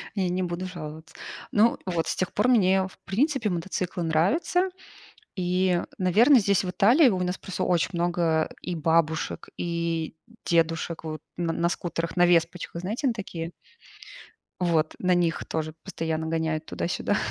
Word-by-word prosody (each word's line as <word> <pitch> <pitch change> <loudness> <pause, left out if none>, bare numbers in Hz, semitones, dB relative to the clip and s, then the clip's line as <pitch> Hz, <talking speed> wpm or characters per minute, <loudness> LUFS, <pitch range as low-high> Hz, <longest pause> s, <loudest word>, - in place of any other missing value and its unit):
я 190 -3 0
не 180 +1 -1
буду 175 +1 -3
жаловаться. 160 -3 -8 0.4
Ну 220 +3 +4
вот, 170 -3 -1
с - - -1
тех 185 - -2
пор 210 +4 +2
мне, 190 -5 +4
в - - -16
принципе, 255 +1 +1
мотоциклы 180 +1 -3
нравятся. 200 - +2 0.7
И, 180 0 +1 0.2
наверно, 220 +10 +5
здесь 200 -1 +2
в 180 - -2
Италии 245 - +5
у 185 -4 0
нас 180 +1 -2
просто 195 - -5
очень 175 0 +1
много 170 -2 +1
и 180 - -4
бабушек, 160 0 0
и 170 -2 -2 0.3
дедушек 165 0 0
вот 155 -1 -5 0.2
н 175 - -1
на 170 - +3
скутерах, 170 -1 -3
на 175 0 +5
веспочках. 170 0 +1
Знаете, 215 - -2
на 250 - +3
такие, 175 -6 -6 1.1
вот 165 -3 +1
на 180 -1 +3
них 170 -2 0
тоже 155 -1 -3
постоянно 160 -4 -3
гоняют 160 -1 -1
туда-сюда. - - -1
175 Hz, 155 wpm, -26 LUFS, 165-190 Hz, 1.1 s, наверно